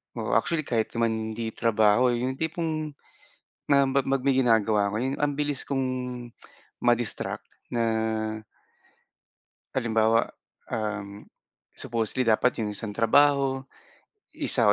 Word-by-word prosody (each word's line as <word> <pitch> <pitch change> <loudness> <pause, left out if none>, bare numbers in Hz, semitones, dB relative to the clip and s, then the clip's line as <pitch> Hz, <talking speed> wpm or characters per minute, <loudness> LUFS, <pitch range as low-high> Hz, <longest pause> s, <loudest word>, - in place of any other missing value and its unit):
Oo, 110 -3 -1
actually 165 +8 +2
kahit 115 -2 0
naman 110 -1 -1
hindi 110 0 -4
trabaho. 115 +2 +3
Yung 125 +2 -1
tipong 160 -1 -2 0.8
na 140 -1 +5
mag 135 0 +1 0.2
may 140 - +3
ginagawa 110 -4 +3
'ko, 100 - -3
yung 130 +4 -2
ang 145 -1 +1
bilis 145 -2 -2
kong 135 -1 0 1.0
ma-distract 120 -2 0 0.2
na 115 -1 -1 1.9
Halimbawa, 115 -2 +2 0.4
um, 105 -2 -4 0.5
supposedly 115 +2 -1
dapat 115 +3 +3
yung 105 -2 -1
isang 110 -1 -4
trabaho, 135 +4 +3 0.7
1 - - +3
120 Hz, 110 wpm, -26 LUFS, 110-135 Hz, 1.9 s, na